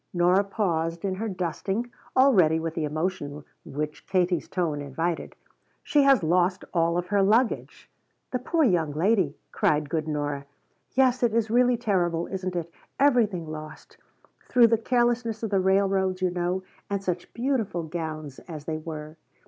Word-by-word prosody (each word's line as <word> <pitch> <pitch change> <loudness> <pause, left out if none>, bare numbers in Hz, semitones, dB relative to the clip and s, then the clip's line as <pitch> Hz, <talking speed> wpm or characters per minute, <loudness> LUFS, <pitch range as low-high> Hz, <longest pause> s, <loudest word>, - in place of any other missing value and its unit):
Nora 180 +3 +4
paused 170 -4 -1
in 190 - 0
her 220 +4 -3
dusting, 195 +5 -3 0.2
all 265 +1 +6
ready 160 -5 +4
with 165 0 -3
the 160 -2 -1
emotion 150 -2 -3 0.2
which 150 +2 -5
Katie's 180 -3 +1
tone 165 -6 -1
invited. 165 +5 -3 0.5
"She 295 - +3
has 275 -8 +5
lost 180 +3 +2
all 170 -1 +2
of 175 0 -3
her 205 -1 +3
luggage!" 220 +5 +1 0.4
"The 250 - -1
poor 320 +6 +1
young 170 - +2
lady!" 175 -2 +1
cried 150 -1 +1
good 160 -2 -1
Nora. 145 -2 -3 0.5
"Yes, 260 -1 +3
it 235 -2 +2
is 225 -2 +1
really 245 0 +4
terrible, 175 -7 0
isn't 185 -1 -4
it? 170 -1 -4 0.3
Everything 230 - +3
lost; 155 0 -9 0.5
through 245 -2 +6
the 230 - +4
carelessness 240 -1 0
of 220 - -2
the 195 - +3
railroads, 190 -1 +2
you 185 -1 +1
know. 180 +1 -1 0.3
And 200 -1 -2
such 180 -2 -3
beautiful 235 -9 -1
gowns 155 -3 -5
as 155 -4 -8
they 155 -1 -3
were. 155 -1 -7
180 Hz, 160 wpm, -26 LUFS, 160-220 Hz, 0.5 s, all